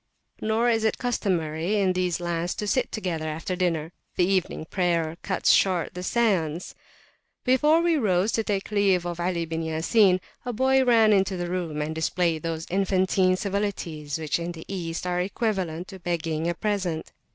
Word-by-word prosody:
Nor 220 Hz, +2 st, +1 dB
is 225 Hz, -2 st, +2 dB
it 220 Hz, -, +1 dB
customary, 185 Hz, -6 st, -1 dB
in 190 Hz, -2 st, +2 dB
these 180 Hz, -2 st, 0 dB
lands, 175 Hz, 0 st, -2 dB
to 210 Hz, -, -3 dB
sit 255 Hz, +5 st, 0 dB
together 170 Hz, -7 st, -3 dB
after 160 Hz, +4 st, -3 dB
dinnerthe 165 Hz, -3 st, -1 dB, 0.3 s
evening 185 Hz, -3 st, +1 dB
prayer 170 Hz, -3 st, 0 dB
cuts 190 Hz, -, +2 dB
short 185 Hz, -3 st, +2 dB
the 180 Hz, -, -6 dB
seance. 180 Hz, -6 st, 0 dB, 0.7 s
Before 300 Hz, +6 st, +4 dB
we 340 Hz, -2 st, +2 dB
rose 200 Hz, -4 st, +2 dB
to 225 Hz, -, 0 dB
take 200 Hz, -1 st, -2 dB
leave 195 Hz, -4 st, +2 dB
of 175 Hz, -1 st, -4 dB
Ali 170 Hz, -1 st, -1 dB
bin 165 Hz, 0 st, -3 dB
Ya 160 Hz, 0 st, -2 dB
Sin, 190 Hz, 0 st, +4 dB, 0.2 s
a 245 Hz, -, -3 dB
boy 265 Hz, +3 st, +3 dB
ran 225 Hz, -4 st, +5 dB
into 195 Hz, -1 st, +2 dB
the 175 Hz, 0 st, -3 dB
room, 165 Hz, -5 st, -2 dB
and 155 Hz, +1 st, -3 dB
displayed 160 Hz, 0 st, 0 dB
those 165 Hz, 0 st, -3 dB
infantine 185 Hz, -1 st, +2 dB
civilities 185 Hz, -7 st, -3 dB
which 155 Hz, 0 st, -1 dB
in 170 Hz, +1 st, -4 dB
the 160 Hz, -1 st, -10 dB
East 170 Hz, -3 st, -4 dB
are 180 Hz, 0 st, 0 dB
equivalent 185 Hz, -4 st, -2 dB
to 190 Hz, -, -9 dB
begging 165 Hz, -2 st, -2 dB
a 175 Hz, -, -1 dB
present. 185 Hz, -5 st, -2 dB
180 Hz, 175 wpm, -25 LUFS, 165-205 Hz, 0.7 s, ran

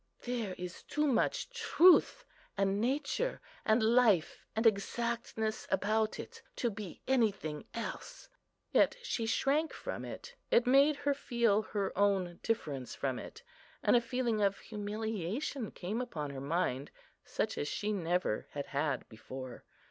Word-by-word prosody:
There 235 Hz, -6 st, -2 dB
is 180 Hz, 0 st, -6 dB
too 300 Hz, +1 st, -1 dB
much -, -, +1 dB
truth 450 Hz, 0 st, +5 dB, 0.3 s
and 195 Hz, +1 st, +1 dB
nature, 285 Hz, -, 0 dB, 0.2 s
and 220 Hz, +1 st, +3 dB
life 220 Hz, -7 st, +4 dB
and 220 Hz, +2 st, 0 dB
exactness 225 Hz, +1 st, 0 dB
about 215 Hz, +3 st, +1 dB
it, -, -, -8 dB
to 240 Hz, -, 0 dB
be 200 Hz, -4 st, -8 dB
anything 200 Hz, -, +1 dB
else." 230 Hz, -, -6 dB, 0.4 s
Yet -, -, +4 dB
she 230 Hz, -, -1 dB
shrank 290 Hz, +7 st, +1 dB
from -, -, -5 dB
it; 485 Hz, -, -8 dB, 0.2 s
it 235 Hz, -, +4 dB
made 275 Hz, +4 st, +5 dB
her 285 Hz, 0 st, 0 dB
feel 235 Hz, -6 st, +2 dB
her 205 Hz, -2 st, -3 dB
own 195 Hz, -4 st, +1 dB
difference 145 Hz, -, -2 dB
from 130 Hz, -2 st, -2 dB
it, 460 Hz, -, -10 dB, 0.4 s
and -, -, +5 dB
a 240 Hz, -, +6 dB
feeling 235 Hz, -2 st, 0 dB
of 200 Hz, -1 st, +2 dB
humiliation 215 Hz, -, -3 dB
came 205 Hz, +7 st, -3 dB
upon 155 Hz, -, -4 dB
her 135 Hz, -1 st, -6 dB
mind, 140 Hz, -3 st, -1 dB, 0.3 s
such -, -, -2 dB
as 145 Hz, -, -1 dB
she 210 Hz, +7 st, -1 dB
never 175 Hz, -, 0 dB
had 145 Hz, -1 st, -3 dB
had 140 Hz, -2 st, 0 dB
before. 125 Hz, +3 st, -9 dB
220 Hz, 140 wpm, -33 LUFS, 180-250 Hz, 0.4 s, a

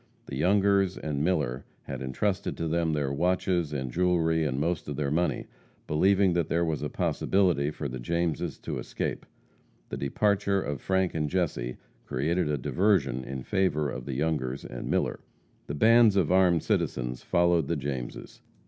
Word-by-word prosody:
The -, -, -6 dB
Youngers 100 Hz, 0 st, +3 dB
and 75 Hz, -2 st, -2 dB
Miller 75 Hz, -8 st, 0 dB, 0.2 s
had 65 Hz, -2 st, -6 dB
entrusted 95 Hz, +10 st, -2 dB
to 80 Hz, -, -2 dB
them 85 Hz, 0 st, +1 dB
their 70 Hz, -2 st, -1 dB
watches 90 Hz, 0 st, +1 dB
and 65 Hz, -4 st, -3 dB
jewelry 80 Hz, -1 st, +2 dB
and 70 Hz, -3 st, -1 dB
most 85 Hz, +2 st, -1 dB
of 75 Hz, -, -4 dB
their 70 Hz, -1 st, -1 dB
money, 85 Hz, +3 st, 0 dB, 0.4 s
believing 95 Hz, +4 st, +3 dB
that 85 Hz, -2 st, 0 dB
there 85 Hz, +1 st, +1 dB
was 80 Hz, -2 st, -2 dB
a -, -, -2 dB
possibility 90 Hz, -7 st, +1 dB
for 75 Hz, -1 st, -4 dB
the 65 Hz, -1 st, -6 dB
Jameses 85 Hz, +5 st, -1 dB
to -, -, -4 dB
escape. -, -, -4 dB, 0.6 s
The -, -, -4 dB
departure 100 Hz, +7 st, +1 dB
of 75 Hz, -7 st, -4 dB
Frank 95 Hz, -1 st, +1 dB
and 75 Hz, -2 st, -1 dB
Jesse 70 Hz, -9 st, -1 dB, 0.3 s
created 80 Hz, +5 st, 0 dB
a 75 Hz, -, 0 dB
diversion 70 Hz, -, +1 dB
in 65 Hz, 0 st, -6 dB
favor 75 Hz, -7 st, 0 dB
of 65 Hz, -1 st, -6 dB
the 70 Hz, -2 st, -4 dB
Youngers 70 Hz, -3 st, -1 dB
and -, -, -6 dB
Miller. -, -, 0 dB, 0.5 s
The 70 Hz, -, -4 dB
bands 115 Hz, +4 st, +6 dB
of 90 Hz, -5 st, +2 dB
armed 90 Hz, -3 st, +4 dB
citizens 60 Hz, 0 st, -1 dB
followed 85 Hz, -3 st, +2 dB
the 85 Hz, -, 0 dB
Jameses. 70 Hz, -4 st, -5 dB
80 Hz, 165 wpm, -28 LUFS, 70-90 Hz, 0.6 s, bands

